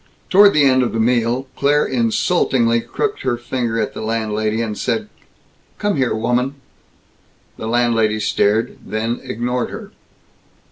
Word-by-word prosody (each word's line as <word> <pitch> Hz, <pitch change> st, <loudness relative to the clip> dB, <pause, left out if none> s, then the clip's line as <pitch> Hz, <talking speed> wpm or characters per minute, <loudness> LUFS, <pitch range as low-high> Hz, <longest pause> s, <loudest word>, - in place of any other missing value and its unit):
Toward 200 Hz, +1 st, +7 dB
the 150 Hz, -, +5 dB
end 130 Hz, -1 st, +4 dB
of 125 Hz, -, -1 dB
the 115 Hz, -, -1 dB
meal 120 Hz, +2 st, +1 dB
Claire 145 Hz, +1 st, +2 dB
insultingly 175 Hz, -, +1 dB
crooked 425 Hz, -, -3 dB
her 120 Hz, -, -1 dB
finger 120 Hz, -1 st, -2 dB
at 110 Hz, -, -2 dB
the -, -, -7 dB
landlady 110 Hz, -1 st, -1 dB
and 110 Hz, -2 st, -2 dB
said, 215 Hz, -, -2 dB, 0.7 s
"Come 205 Hz, -2 st, 0 dB
here, 130 Hz, -5 st, 0 dB
woman." 125 Hz, +4 st, 0 dB, 1.0 s
The 110 Hz, -, -5 dB
landlady 115 Hz, -2 st, +1 dB
stared, 105 Hz, +1 st, 0 dB
then 115 Hz, +2 st, -3 dB
ignored 125 Hz, 0 st, -2 dB
her. -, -, -9 dB
120 Hz, 140 wpm, -19 LUFS, 115-135 Hz, 1.0 s, Toward